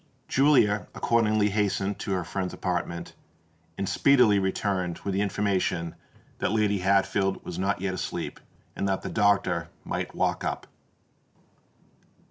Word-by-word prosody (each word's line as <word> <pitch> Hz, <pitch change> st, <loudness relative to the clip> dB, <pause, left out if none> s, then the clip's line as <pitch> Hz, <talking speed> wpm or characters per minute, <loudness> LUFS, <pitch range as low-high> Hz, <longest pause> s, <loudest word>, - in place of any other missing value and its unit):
Julia 130 Hz, -7 st, +3 dB
accordingly 110 Hz, -3 st, +2 dB
hastened 100 Hz, -1 st, 0 dB
to 100 Hz, -, -4 dB
her 90 Hz, -2 st, -1 dB
friend's 90 Hz, +2 st, -4 dB
apartment, 85 Hz, -1 st, -3 dB, 0.6 s
and 100 Hz, -, -2 dB
speedily 125 Hz, -7 st, +4 dB
returned 95 Hz, -2 st, -1 dB
with 100 Hz, -, -1 dB
the 100 Hz, -, +1 dB
information 95 Hz, -4 st, 0 dB, 0.5 s
that -, -, 0 dB
Lady 105 Hz, -2 st, +2 dB
Hatfield 95 Hz, +1 st, +1 dB
was 90 Hz, -, -5 dB
not 95 Hz, 0 st, 0 dB
yet 95 Hz, -1 st, -1 dB
asleep, -, -, -4 dB, 0.4 s
and 100 Hz, -, -1 dB
that 95 Hz, -, -1 dB
the -, -, -4 dB
doctor 100 Hz, -5 st, +2 dB, 0.2 s
might -, -, -3 dB
walk -, -, 0 dB
up. -, -, -3 dB
100 Hz, 130 wpm, -27 LUFS, 95-105 Hz, 0.6 s, speedily